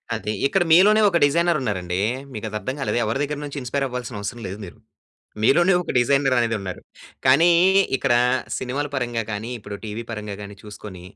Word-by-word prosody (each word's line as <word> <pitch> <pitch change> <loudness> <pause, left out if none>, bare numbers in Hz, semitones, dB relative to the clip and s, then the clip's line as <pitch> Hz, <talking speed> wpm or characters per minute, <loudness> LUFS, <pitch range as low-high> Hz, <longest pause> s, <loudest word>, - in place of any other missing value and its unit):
అది 110 -1 -3
ఇక్కడ 190 +4 +1
మీలోనే 205 +6 +6
ఒక 170 - +1
డిజైర్ 170 +3 +2
ఉన్నారండి. 95 -5 -2 0.3
మీకది 110 -1 -6
అర్థం 130 +4 -4
కాలేదు. 135 - -1
ఎవరి 115 +5 -1
దగ్గర 145 0 -3
నుంచి 145 0 -7
ఇన్‌స్పైర్ 135 +3 -2
అవ్వాల్సిన 125 -3 -5
అవసరం 115 +4 -5
లేదు 95 - -6
మీరు. 90 - -12 0.7
మీలోనే 175 - +4
ఒక - - -4
డిజైర్ 135 +2 +3
అనేది 115 -1 +1
ఉన్నారు. 95 -2 -6 0.5
కానీ 140 +7 +6 0.5
ఇక్కడ 130 -3 +1 0.4
సినిమాల 135 +3 -3
పరంగా 120 -4 -2
కానీ, 110 +2 -4
ఇప్పుడు 105 -1 -8
టీవీ 110 +2 -5
పరంగా 105 -2 -5
గాని 100 0 -8
చూసుకొని, 105 -3 -10
120 Hz, 170 wpm, -22 LUFS, 105-140 Hz, 0.7 s, మీలోనే